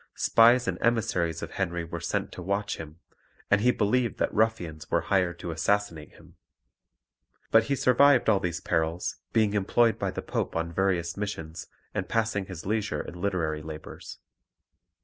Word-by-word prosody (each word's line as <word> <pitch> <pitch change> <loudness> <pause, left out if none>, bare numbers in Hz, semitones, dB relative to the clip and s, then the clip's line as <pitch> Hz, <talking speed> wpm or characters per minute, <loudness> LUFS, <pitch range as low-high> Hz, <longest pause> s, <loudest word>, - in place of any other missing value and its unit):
Spies 120 +2 +5
and - - -2
emissaries 95 -8 0
of - - -6
Henry 85 -3 -2
were 85 +1 -6
sent 85 - -2
to - - -8
watch 100 +3 -2
him, 80 0 -9 0.5
and 105 0 +4
he 125 - +4
believed 120 +1 +1
that - - -1
ruffians 90 -9 -1
were - - +2
hired 90 -3 0
to 85 - -5
assassinate 80 -1 -1
him. - - -19 1.1
But 115 0 +5
he 140 - 0
survived 130 0 +4
all 105 -3 +4
these 85 -2 -3
perils, 80 +2 -1
being 110 -2 +2
employed 110 +3 +2
by - - -1
the - - -5
Pope - - -3
on 85 0 -2
various 85 -2 0
missions 85 -6 -5 0.3
and - - -3
passing 110 -4 0
his 90 -4 -8
leisure 105 -7 -1
in 85 - -9
literary 85 -6 -1
labours. 80 0 -9
95 Hz, 165 wpm, -27 LUFS, 85-110 Hz, 1.1 s, Spies